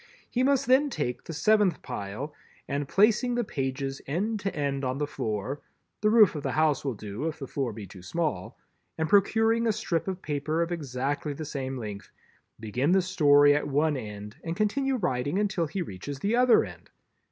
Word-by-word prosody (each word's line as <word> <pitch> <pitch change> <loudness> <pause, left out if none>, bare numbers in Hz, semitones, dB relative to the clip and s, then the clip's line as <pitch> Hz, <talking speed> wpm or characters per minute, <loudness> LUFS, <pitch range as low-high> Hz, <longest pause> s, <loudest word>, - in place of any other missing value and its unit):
He 250 - +1
must 270 0 +3
then 265 +4 +4
take 125 - -3
the - - -6
seventh 205 +2 +2
pile 105 +10 -5 0.3
and 140 0 -2
placing 220 - +3
the 240 - +1
pages 135 - -3
end 205 +10 -1
to 195 0 -3
end 140 -2 -1
on 130 0 -1
the 145 - 0
floor—the 135 - -4
roof 215 -3 +6
of 150 - -4
the - - -2
house 155 -3 +2
will 135 -4 -2
do 105 +8 -5
if 160 - -4
the 140 - -6
floor 135 -2 -2
be 105 -1 -8
too 95 0 -12
small—and 155 - -4
procuring 225 +4 +3
a - - +4
strip 190 -6 -2
of 190 -1 -4
paper 155 +3 -1
of 170 - -5
exactly 145 -1 -2
the 155 +2 -6
same 135 -2 -4
length, 105 -4 -7 0.5
begin 125 - 0
the 190 - +5
Story 145 -5 +5
at 145 - -1
one 145 +2 +2
end 105 -3 -7
and 165 0 -3
continue 265 +6 +1
writing 145 - -1
until 200 -5 0
he 185 +4 -3
reaches 135 - -7
the 205 - 0
other 250 -1 +5
end. - - -12
150 Hz, 185 wpm, -27 LUFS, 130-200 Hz, 0.5 s, roof